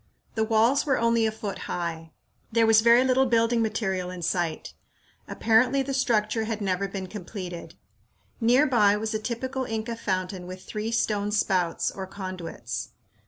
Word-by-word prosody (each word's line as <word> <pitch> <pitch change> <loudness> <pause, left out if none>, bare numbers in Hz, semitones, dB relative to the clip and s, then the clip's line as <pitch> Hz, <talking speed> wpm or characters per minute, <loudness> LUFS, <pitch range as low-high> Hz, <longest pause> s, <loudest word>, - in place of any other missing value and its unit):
The 220 - 0
walls 225 +5 +3
were 275 -4 +1
only 230 -1 +2
a - - -1
foot 210 -2 -6
high. 165 -2 -4 0.4
There 230 0 +4
was 220 0 +6
very 235 +2 +6
little 260 0 +3
building 230 0 +2
material 195 -5 -1
in 180 -1 -7
sight. 170 -2 -2 0.5
Apparently 245 +5 +3
the 275 +1 -4
structure 225 -4 +1
had 220 -1 -3
never 195 -1 -1
been 195 -1 -5
completed. 185 -2 -7 0.6
Near 245 +5 +4
by 210 -6 +4
was 220 +1 -3
a 215 - -1
typical 260 +4 -3
Inca 225 0 -3
fountain 185 -3 -3
with 185 0 -8
three 215 +1 -4
stone 210 -2 0
spouts, 185 -5 +1
or 190 -1 -6
conduits. 185 - -6
215 Hz, 160 wpm, -26 LUFS, 185-230 Hz, 0.6 s, was